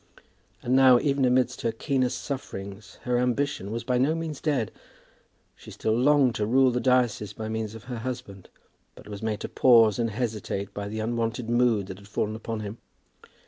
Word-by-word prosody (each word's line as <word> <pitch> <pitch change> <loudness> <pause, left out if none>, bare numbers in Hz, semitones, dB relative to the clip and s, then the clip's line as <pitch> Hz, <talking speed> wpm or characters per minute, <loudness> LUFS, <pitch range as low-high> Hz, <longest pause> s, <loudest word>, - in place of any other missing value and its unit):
And 125 +2 +1
now, 130 -2 +7
even 140 -1 +1
amidst 125 0 +1
her 115 - 0
keenest 130 +1 -1
sufferings, 100 -7 -7
her 125 -1 +1
ambition 125 -4 -1
was 115 +2 -4
by 125 +1 0
no 145 +5 +2
means 160 -3 -5
dead. 135 -9 0 0.8
She - - -14
still 110 - -1
longed 135 0 +4
to 105 - -1
rule 130 +2 +4
the 125 - -1
diocese 120 -5 +1
by 110 +1 -6
means 110 -1 -3
of 110 - -10
her 125 -2 -6
husband, 120 -6 -7 0.5
but - - -14
was 105 -1 -7
made 110 -1 -2
to - - -3
pause 115 -5 +5
and 115 -1 +1
hesitate 105 -3 -3
by 100 0 -5
the 110 +1 -4
unwonted 115 +1 -2
mood 120 -4 +2
that 95 0 -9
had 100 - -15
fallen 105 +1 -2
upon 110 0 -5
him. 105 +2 -7
115 Hz, 185 wpm, -26 LUFS, 110-130 Hz, 0.8 s, now